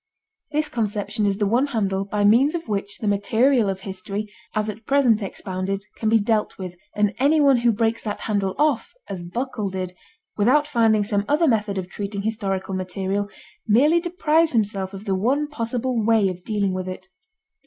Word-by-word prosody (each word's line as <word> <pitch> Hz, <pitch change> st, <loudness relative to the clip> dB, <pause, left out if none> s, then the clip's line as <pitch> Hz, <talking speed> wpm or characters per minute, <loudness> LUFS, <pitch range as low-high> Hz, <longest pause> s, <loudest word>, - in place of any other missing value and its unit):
This 305 Hz, +1 st, 0 dB
conception 210 Hz, -4 st, -1 dB
is 195 Hz, -1 st, 0 dB
the 205 Hz, -, +1 dB
one 240 Hz, +7 st, +2 dB
handle 195 Hz, -6 st, -1 dB
by 205 Hz, +1 st, -1 dB
means 255 Hz, +10 st, +5 dB
of 335 Hz, -4 st, -4 dB
which 200 Hz, -1 st, -3 dB
the 215 Hz, -, -4 dB
material 220 Hz, +3 st, +3 dB
of 190 Hz, 0 st, -3 dB
history, 200 Hz, +2 st, -5 dB, 0.2 s
as 215 Hz, 0 st, 0 dB
at 215 Hz, +1 st, -7 dB
present 255 Hz, -6 st, +3 dB
expounded, 195 Hz, 0 st, -3 dB
can 220 Hz, -, -1 dB
be 225 Hz, -, +5 dB
dealt 215 Hz, 0 st, 0 dB
with, 185 Hz, -2 st, -6 dB, 0.2 s
and 210 Hz, 0 st, +2 dB
anyone 280 Hz, -1 st, +5 dB
who 240 Hz, 0 st, +3 dB
breaks 225 Hz, +1 st, 0 dB
that 210 Hz, -2 st, -4 dB
handle 200 Hz, -3 st, -1 dB
off, 295 Hz, -6 st, +1 dB
as 185 Hz, -3 st, -5 dB
Buckle 220 Hz, +3 st, -3 dB
did, 185 Hz, -1 st, -4 dB, 0.4 s
without 255 Hz, +8 st, +4 dB
finding 225 Hz, -7 st, +3 dB
some 200 Hz, -1 st, 0 dB
other 310 Hz, +3 st, +3 dB
method 210 Hz, -5 st, +1 dB
of 185 Hz, -1 st, -3 dB
treating 200 Hz, +1 st, -5 dB
historical 195 Hz, -3 st, -2 dB
material, 190 Hz, +2 st, -2 dB, 0.4 s
merely 285 Hz, +10 st, +5 dB
deprives 330 Hz, -2 st, +1 dB
himself 200 Hz, -3 st, 0 dB
of 195 Hz, +2 st, -9 dB
the 195 Hz, -, 0 dB
one 260 Hz, +10 st, +1 dB
possible 245 Hz, -3 st, -2 dB
way 220 Hz, -3 st, +3 dB
of 180 Hz, -1 st, -7 dB
dealing 205 Hz, -3 st, 0 dB
with 185 Hz, 0 st, -3 dB
it. 185 Hz, 0 st, -7 dB
210 Hz, 180 wpm, -23 LUFS, 195-245 Hz, 0.4 s, means